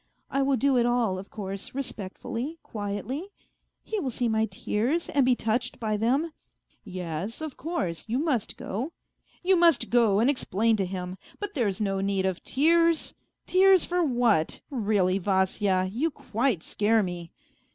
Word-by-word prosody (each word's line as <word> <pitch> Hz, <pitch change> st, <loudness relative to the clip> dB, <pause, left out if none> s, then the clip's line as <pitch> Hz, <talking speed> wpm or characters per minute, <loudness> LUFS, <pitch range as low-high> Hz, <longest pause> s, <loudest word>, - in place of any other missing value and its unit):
I 275 Hz, -, +1 dB
will 275 Hz, -1 st, +2 dB
do 270 Hz, +1 st, +3 dB
it 240 Hz, -, +3 dB
all, 235 Hz, -6 st, +1 dB
of 195 Hz, -, -10 dB
course, 195 Hz, +1 st, -6 dB
respectfully, 245 Hz, -, -4 dB
quietly; 210 Hz, -, -4 dB, 0.6 s
he 435 Hz, -, -3 dB
will 275 Hz, -, -2 dB
see 245 Hz, 0 st, -1 dB
my 220 Hz, 0 st, +1 dB
tears 235 Hz, -, -1 dB
and 280 Hz, -, +3 dB
be 250 Hz, 0 st, +4 dB
touched 230 Hz, +2 st, -1 dB
by 215 Hz, -2 st, -1 dB
them. 265 Hz, +10 st, +1 dB, 0.2 s
..." -, -, -49 dB
" -, -, -41 dB
Yes, 185 Hz, +1 st, -5 dB
of 315 Hz, -3 st, -5 dB
course, 295 Hz, -, -3 dB
you 230 Hz, +3 st, 0 dB
must 275 Hz, -7 st, -1 dB
go, 255 Hz, -, -4 dB, 0.5 s
you 375 Hz, +1 st, +4 dB
must 335 Hz, -9 st, +4 dB
go 225 Hz, -5 st, +4 dB
and 230 Hz, -, +3 dB
explain 230 Hz, -5 st, +2 dB
to 195 Hz, -2 st, 0 dB
him.... 180 Hz, 0 st, -5 dB, 0.2 s
But 410 Hz, 0 st, -4 dB
there's 210 Hz, -8 st, 0 dB
no 195 Hz, -2 st, 0 dB
need 195 Hz, -1 st, 0 dB
of 185 Hz, -2 st, -1 dB
tears! 335 Hz, +3 st, +3 dB, 0.3 s
Tears 375 Hz, 0 st, +5 dB
for 355 Hz, 0 st, +1 dB
what? 240 Hz, -, +2 dB
Really, 205 Hz, -6 st, +1 dB
Vasya, 190 Hz, 0 st, +1 dB
you 270 Hz, +10 st, 0 dB
quite 235 Hz, -, -1 dB
scare 215 Hz, +1 st, +2 dB
me." 175 Hz, -2 st, -5 dB
230 Hz, 165 wpm, -27 LUFS, 195-275 Hz, 0.6 s, Tears